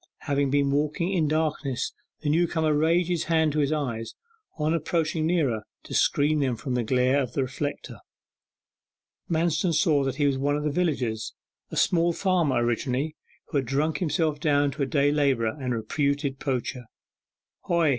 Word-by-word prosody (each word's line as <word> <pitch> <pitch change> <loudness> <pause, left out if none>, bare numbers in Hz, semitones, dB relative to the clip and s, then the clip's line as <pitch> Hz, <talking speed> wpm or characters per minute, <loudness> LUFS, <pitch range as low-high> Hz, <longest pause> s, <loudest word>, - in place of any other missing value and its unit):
Having 140 -1 0
been 140 0 +2
walking 150 +6 0
in 165 -5 +2
darkness 150 -4 -1 0.3
the 150 - -1
newcomer 160 -1 +2
raised 165 +3 +2
his 175 -3 -1
hands 160 -2 +2
to 155 - 0
his 145 0 +1
eyes, 120 -7 -3 0.4
on 155 +1 +1
approaching 160 0 0
nearer, 145 -11 +1 0.2
to - - -9
screen 150 +2 +2
them 130 -4 +1
from 130 +2 -4
the 125 -1 0
glare 130 +4 +2
of 125 -2 -4
the 135 - +1
reflector. 140 +3 -5 1.3
Manston 170 +1 +1
saw 155 -3 +3
that 135 -1 -2
he 145 +1 +1
was 135 -2 +1
one 145 +1 +1
of 150 - -3
the 150 - 0
villagers: 130 -10 -1 0.3
a - - -6
small 170 0 +3
farmer 165 -10 +1
originally, 130 +5 -1 0.3
who - - -1
had 135 -3 -1
drunk 150 +4 0
himself 160 -3 0
down 145 -2 +2
to 145 +2 -6
a 140 - +1
day 145 0 +2
labourer 135 -7 +1
and 125 -2 -2
reputed 140 +3 -1
poacher. 125 -2 -3 0.8
'Hoy! 170 -3 +2
145 Hz, 170 wpm, -26 LUFS, 135-160 Hz, 1.3 s, saw